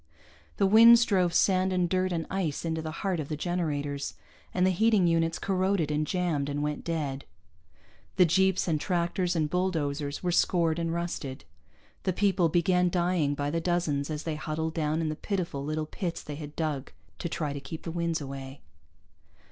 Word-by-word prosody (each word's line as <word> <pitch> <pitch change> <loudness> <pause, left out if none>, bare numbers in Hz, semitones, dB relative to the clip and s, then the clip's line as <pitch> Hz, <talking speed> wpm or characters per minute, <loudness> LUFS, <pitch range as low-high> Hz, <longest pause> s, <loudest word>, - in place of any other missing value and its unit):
The 200 - +3
winds 230 +3 +8
drove 185 -4 +2
sand 185 +1 +3
and 180 -1 +1
dirt 185 +1 0
and 165 -2 -2
ice 170 -6 -2
into 160 -1 -1
the 160 - -5 0.2
heart 185 -4 0
of 145 - -4
the 155 - -3
generators, 145 -4 -2 0.4
and 180 0 +2
the 190 - +4
heating 210 0 +3
units 165 -1 +2
corroded 190 -4 0
and 150 0 0
jammed 170 -6 -1
and 145 +1 -2
went 150 0 -3
dead. 145 -5 -3 0.9
The 180 - +6
jeeps 190 +3 +2
and 155 -3 0
tractors 175 0 0
and 155 -2 +1
bulldozers 150 -5 -1
were 180 - +1
scored 170 -2 +2
and 165 -1 -1
rusted. 170 -6 -4 0.6
The 185 - 0
people 190 -3 +2
began 180 +2 +2
dying 175 -5 +1
by 145 0 -2
the 165 +1 -1
dozens 165 -5 0
as 150 -1 -4
they 160 -2 -3
huddled 155 +1 -3
down 155 0 0
in 160 - -1
the 155 - -3
pitiful 170 -6 -3
little 155 +1 -2
pits 170 +2 -4
they 150 - -6
had 150 0 -8
dug 150 -4 -2 0.3
to 170 - -3
try 150 -3 -2
to 140 - -5
keep 160 +3 -8
the 165 - -4
winds 170 -1 -1
away. 135 -1 -7
165 Hz, 185 wpm, -28 LUFS, 150-180 Hz, 0.9 s, winds